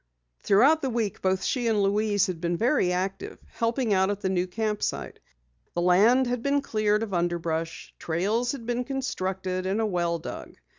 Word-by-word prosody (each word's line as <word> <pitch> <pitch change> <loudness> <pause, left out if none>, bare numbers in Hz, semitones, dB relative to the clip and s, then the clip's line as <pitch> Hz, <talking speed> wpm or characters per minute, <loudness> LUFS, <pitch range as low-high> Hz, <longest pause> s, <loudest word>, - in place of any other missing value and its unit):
Throughout 275 +11 +4
the 270 - -1
week 225 -5 -2
both 190 0 +1
she 245 -3 0
and 215 -3 +2
Louise 205 0 +2
had 175 -3 -5
been 170 0 -1
very 230 - +2
active, 190 +2 -3 0.2
helping 230 -1 0
out 190 0 +3
at 205 0 -3
the 190 - 0
new 180 -1 0
camp 210 +2 -2
site. - - -3 0.6
The 175 - 0
land 210 +9 +5
had 245 -1 -2
been 280 +2 +1
cleared 215 -3 +1
of 210 -3 -5
underbrush, 170 -2 -2
trails 210 - 0
had 250 -5 -7
been 240 +1 -1
constructed, 190 -8 -3
and 195 +3 0
a 225 - +1
well 175 -4 0
dug. 160 - -8
205 Hz, 185 wpm, -26 LUFS, 185-235 Hz, 0.6 s, land